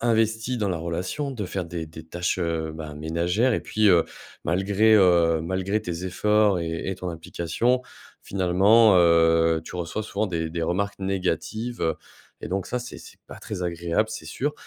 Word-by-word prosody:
investi 115 +1 +1
dans 105 -2 0
la 90 - -1
relation, 90 - -3
de 115 -6 -4
faire 95 0 -3
des 85 -1 -5
des 80 0 -11
tâches, 85 +3 -2
heu, 80 -2 -2
bah, 80 -2 -7
ménagères. 85 +10 0
Et - - -1
puis, 110 0 0
heu, 85 -3 +5 0.4
malgré 100 +5 +3
heu, 85 -4 +4
malgré 95 +5 -1
tes 90 -2 -5
efforts 105 +1 +2
et 80 +1 -3
et - - -2
ton 90 -1 -5
implication, 85 +9 -1 0.4
finalement, 100 +3 +4
heu, 80 -1 +4
tu - - -8
reçois 90 +5 -3
souvent 105 0 -2
des 80 -4 -3
des 85 0 -3
remarques 100 +4 -1
négatives. 95 +1 -2 0.5
Et - - -5
donc 95 0 -2
ça, 125 - -2
c'est 125 0 -8
c'est - - -14
pas - - -10
très 105 -5 -6
agréable, 85 +5 -1
c'est 110 - -7
sûr. 145 +3 -2
90 Hz, 175 wpm, -25 LUFS, 85-110 Hz, 0.5 s, heu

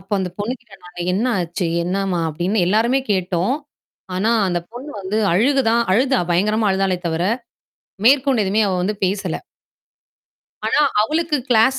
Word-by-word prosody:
அப்ப 190 - -23
அந்தப் 180 -2 -4
பொண்ணு 210 +4 -2
கிட்ட 215 -5 -17
நாங்க 175 0 -10
"என்ன 210 +7 0
ஆச்சு? 175 +1 -2 0.2
என்னம்மா?" 185 -1 -1
அப்படின்னு 175 +7 -1
எல்லாருமே 230 +7 +2
கேட்டோம். 185 +4 0 0.6
ஆனா 200 +5 +1 0.2
அந்தப் 175 -1 -3
பொண்ணு 260 +5 -8
வந்து 195 +3 -2
அழுகதான். 235 +3 +3
அழுதா. 260 +5 +3
பயங்கரமா 210 +4 +2
அழுதாலே 190 -1 +1
தவிர 160 +1 -1 0.8
மேற்கொண்டு 265 -3 +4
எதுவுமே 210 +3 +2
அவ 190 - 0
வந்து 205 +4 -1
பேசல. 190 -2 -1 1.3
ஆனா - - +2 0.2
அவளுக்கு 315 +5 0
க்ளாஸ் 250 +3 +4
205 Hz, 145 wpm, -20 LUFS, 185-240 Hz, 1.3 s, மேற்கொண்டு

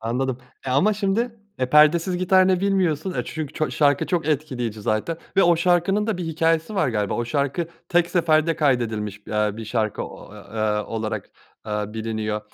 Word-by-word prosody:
Anladım, 125 +3 -2 0.3
eee, 130 - 0
ama 185 +11 +4
şimdi, 220 +4 -1 0.2
eee, 130 -1 -1
perdesiz 165 +5 +5
gitar 185 +1 +4
ne 185 -1 +2
bilmiyorsun, 190 -3 0
eee, - - -1
çünkü 155 -2 -5
ço 155 - -1
şarkı 145 -2 +2
çok 170 -3 -1
etkileyici 130 -8 -2
zaten 110 +10 -1 0.2
ve 195 - +6
o 175 -1 +5
şarkının 180 +4 +2
da 220 - 0
bir 180 - -3
hikâyesi 165 +3 0
var 190 - +2
galiba. 105 -4 -1
O 120 - -1
şarkı 140 +6 -1 0.2
tek 175 -1 +2
seferde 165 -2 +2
kaydedilmiş, 110 -8 0
aaa, 105 0 0
bir 115 - -6
şarkı 110 -1 -1
o - - -10
ı - - -12
aaa 105 0 -2
olarak, 110 -2 -4 0.3
aaa, 105 0 -3
biliniyor. 110 -1 -2
150 Hz, 180 wpm, -23 LUFS, 110-175 Hz, 0.3 s, ve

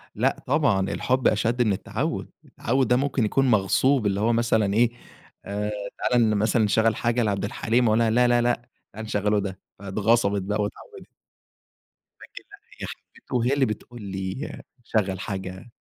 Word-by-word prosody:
لا، - - 0
طبعًا، 105 -11 +2
الحب 130 0 +1
أشد 115 +3 +1
من 105 -4 +3
التعود، - - -3 0.2
التعود 130 +1 -1
ده 125 - +4
ممكن 135 -3 +1
يكون 135 +6 +1
مغصوب، 110 +5 +3
اللي 100 -1 +1
هو 115 +3 +2
مثلًا 110 -3 +1
إيه 120 +2 +3 0.5
آآ، 105 +1 -3 0.3
تعالى 115 -3 +2
مثلًا 110 +2 +2
نشغل 110 +1 +2
حاجة 120 0 0
لعبد 100 -1 -1
الحليم 120 +2 +1
وأقول 110 +1 +3
لها 115 -1 +3
لا، 125 +2 +4
لا، 120 0 +3
لا، 120 0 +1 0.3
تعالي 110 +2 -7
نشغلوا 105 0 +1
ده 95 -1 -5 0.2
فاتغصبت 100 +1 +1
بقى 105 +3 -1
واتعودت. 105 - -7 1.2
أكيد - - -10 0.2
لأ، - - -47 0.2
هي - - -4
اللي - - -6 0.3
حبته - - -7
وهي 125 +2 +2
اللي 140 -1 +3
بتقول 115 +2 -6
لي 95 +7 -5 0.2
شغل 100 -5 -1
حاجة 95 +2 -6
110 Hz, 165 wpm, -25 LUFS, 100-120 Hz, 1.2 s, ده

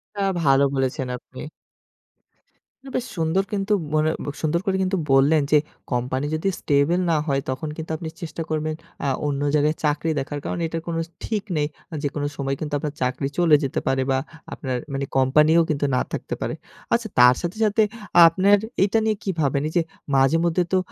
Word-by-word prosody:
তা 200 - -3 0.2
ভালো 135 -1 +5
বলেছেন 130 -1 -1
আপনি। 130 - -14 1.6
বেশ 250 - -1
সুন্দর 165 +4 +1
কিন্তু 200 +1 0 0.2
মনে 155 0 +3 0.3
সুন্দর 160 +2 +1
করে 195 - +1 0.4
বললেন 140 +3 +5
যে 155 - +7 0.3
কোম্পানি 130 +2 -1
যদি 160 - -2
স্টেবল 145 +5 +2
না - - +3
হয়, 140 -1 +1
তখন 130 +4 -3
কিন্তু 160 0 -6
আপনি 160 0 -6
চেষ্টা 165 -1 -5
করবেন 155 0 -1 0.3
আ - - +1 0.2
অন্য 140 -1 -1
জায়গায় 150 +1 +2
চাকরি 150 +2 +1
দেখার 145 +2 -4
কারণ - - -3
এটা 165 +1 -3
কোনো 165 -1 -1 0.2
ঠিক 210 -3 -2
নেই। 150 0 +1 0.4
যেকোনো 145 0 -2
সময় 135 0 -1
কিন্তু 150 -1 -5
আপনার 145 0 -4
চাকরি 125 +2 0
চলে 170 -4 +5
যেতে 135 - -1
পারে, 135 0 +2
বা 130 - +2 0.4
আপনার 130 -3 -3 0.2
মানি 135 0 -1
কোম্পানিও 150 +5 +5
কিন্তু 145 -2 0
না - - +2
থাকতে - - -4
পারে। - - -2 0.4
আচ্ছা 235 -2 +1
তার 125 +1 +8
সাথে, 175 +4 -4
সাথে 215 +1 +3 0.4
আপনার 190 +5 +4 0.3
এটা 215 +3 +2
নিয়ে 220 -1 +2
কি - - -3
ভাবেন? 140 0 +1
যে 175 - +4 0.3
মাঝে 135 +4 +4
মধ্যে 170 +1 +2
তো - - +5
150 Hz, 175 wpm, -23 LUFS, 135-170 Hz, 1.6 s, তার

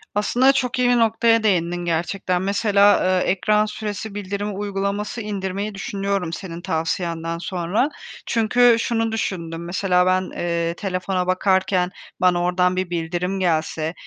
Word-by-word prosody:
Aslında 245 +6 +3
çok 255 -2 -1
iyi 250 -1 +3
bir 245 - +4
noktaya 225 0 +3
değindin 175 -3 +1
gerçekten. 180 +2 -1
Mesela, 200 +1 +3
eee, 185 -1 +2
ekran 210 +3 +2
süresi 210 -1 -5
bildirim 200 0 -4
uygulaması 205 +2 -3
indirmeyi 200 0 -4
düşünüyorum 195 -3 -2
senin 170 -2 -6
tavsiyenden 165 0 -2
sonra. 180 - -1 0.4
Çünkü 240 +1 +4
şunu 225 -1 0
düşündüm, 170 -6 -3
mesela 180 0 +1
ben, 185 0 +1
eee, 170 -1 -1
telefona 185 -1 -2
bakarken 185 -1 +1 0.3
bana 180 -1 +3
oradan 180 0 +2
bir 185 -1 -2
bildirim 175 +3 -2
gelse, 160 -2 0
190 Hz, 130 wpm, -22 LUFS, 175-210 Hz, 0.4 s, bir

